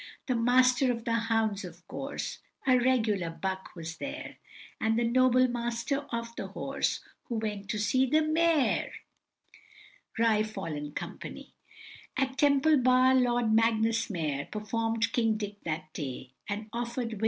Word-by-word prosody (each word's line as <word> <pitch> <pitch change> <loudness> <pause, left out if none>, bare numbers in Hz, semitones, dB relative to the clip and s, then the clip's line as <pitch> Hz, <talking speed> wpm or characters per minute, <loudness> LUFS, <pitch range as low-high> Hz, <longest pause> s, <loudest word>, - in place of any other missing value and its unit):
The 255 - 0
Master 250 +2 +4
of 230 -1 -5
the 230 - 0
Hounds, 225 -3 +1
of - - -11
course, - - -5 0.3
(A 255 - +5
regular 220 -8 +2
buck) 190 +3 -4
was 165 -1 -6
there, 290 +3 -6 0.4
And 220 0 +1
the 240 - +2
noble 255 +1 +4
Master 240 +4 -2
of 235 0 -4
the - - -4
Horse, - - -2 0.2
Who 235 - -4
went 210 -3 -3
to 215 - -1
see 255 +6 +2
the 310 +4 +3
mayor! 315 -2 +2 1.3
Ri 225 -2 +3
fol, 165 -9 -4
&c. - - -8 0.6
At 265 -1 0
Temple 290 +2 +4
Bar, 255 0 +5
Lord 240 -3 +3
Magnus 225 0 +2
Mayor, 150 -7 -2
Perform'd 225 +2 -1
King 225 -3 +2
Dick 205 -1 -6
that 155 -1 -4
day, 130 -3 -6 0.2
And 210 +1 -3
offer'd 235 0 -3
Vic. 220 - -6
230 Hz, 145 wpm, -29 LUFS, 210-255 Hz, 1.3 s, A